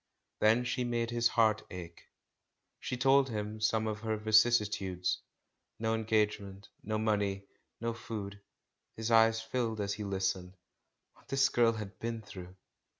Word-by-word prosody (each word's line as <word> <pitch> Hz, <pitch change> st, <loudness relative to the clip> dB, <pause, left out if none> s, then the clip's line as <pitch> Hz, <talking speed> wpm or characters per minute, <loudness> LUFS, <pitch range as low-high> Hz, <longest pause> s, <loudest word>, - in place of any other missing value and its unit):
Then 110 Hz, +3 st, +4 dB
she 125 Hz, 0 st, -1 dB
made 120 Hz, -1 st, -1 dB
his 120 Hz, 0 st, +3 dB
heart 110 Hz, -2 st, +3 dB
ache; 85 Hz, -2 st, -9 dB, 0.7 s
she 125 Hz, -, -4 dB
told 135 Hz, +2 st, +4 dB
him 105 Hz, -1 st, -4 dB
some 110 Hz, +1 st, +1 dB
of 105 Hz, -1 st, -2 dB
her 110 Hz, 0 st, -2 dB
vicissi 110 Hz, +1 st, +4 dB
tudes 95 Hz, -3 st, -2 dB, 0.3 s
— -, -, -52 dB
no 110 Hz, 0 st, 0 dB
engagement, 105 Hz, -3 st, -1 dB
no 110 Hz, +1 st, -1 dB
money, 100 Hz, -2 st, 0 dB, 0.3 s
no 115 Hz, 0 st, -2 dB
food. 100 Hz, -3 st, -7 dB, 0.6 s
His 110 Hz, +1 st, -2 dB
eyes 115 Hz, 0 st, +5 dB
filled 115 Hz, -1 st, -2 dB
as 100 Hz, 0 st, -1 dB
he 105 Hz, -, -5 dB
listened. 95 Hz, -2 st, -2 dB, 0.6 s
What -, -, -25 dB
this 135 Hz, 0 st, +3 dB
girl 115 Hz, -2 st, +3 dB
had 105 Hz, -2 st, -7 dB
been 115 Hz, -1 st, -4 dB
through 90 Hz, -2 st, -10 dB
110 Hz, 150 wpm, -32 LUFS, 100-115 Hz, 0.7 s, eyes